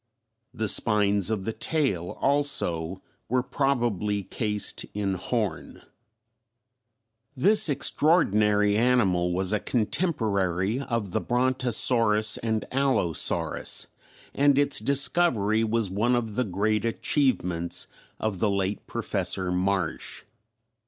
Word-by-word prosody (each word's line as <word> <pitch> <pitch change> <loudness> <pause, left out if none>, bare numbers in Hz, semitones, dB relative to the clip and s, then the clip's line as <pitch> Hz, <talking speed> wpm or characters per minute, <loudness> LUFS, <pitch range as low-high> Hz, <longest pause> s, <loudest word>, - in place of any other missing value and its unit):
The 110 -3 -3
spines 105 -2 +2
of 105 -4 -2
the 115 - -2
tail, 110 - -2
also, 95 - 0 0.3
were 125 +1 +1
probably 120 -7 -1
cased 105 +2 -4
in 100 -2 -1
horn. 95 - -4 1.5
This 195 +7 +4
extraordinary 105 - +2
animal 100 -7 +2
was 95 +3 0
a 105 - +1
contemporary 105 - -1
of 115 -8 -3
the - - -1
Brontosaurus 120 -3 +2
and 110 -2 -2
Allosaurus, 130 - 0 0.5
and 140 0 +3
its 145 0 +3
discovery 135 -7 +2
was 110 -3 0
one 115 +6 +1
of 115 -3 -2
the 125 +4 -1
great 105 +2 -1
achievements 110 - 0 0.3
of 105 -4 -2
the 105 - +1
late 100 0 -2
Professor 95 -1 -2
Marsh. 95 +2 -2
110 Hz, 105 wpm, -26 LUFS, 100-125 Hz, 1.5 s, This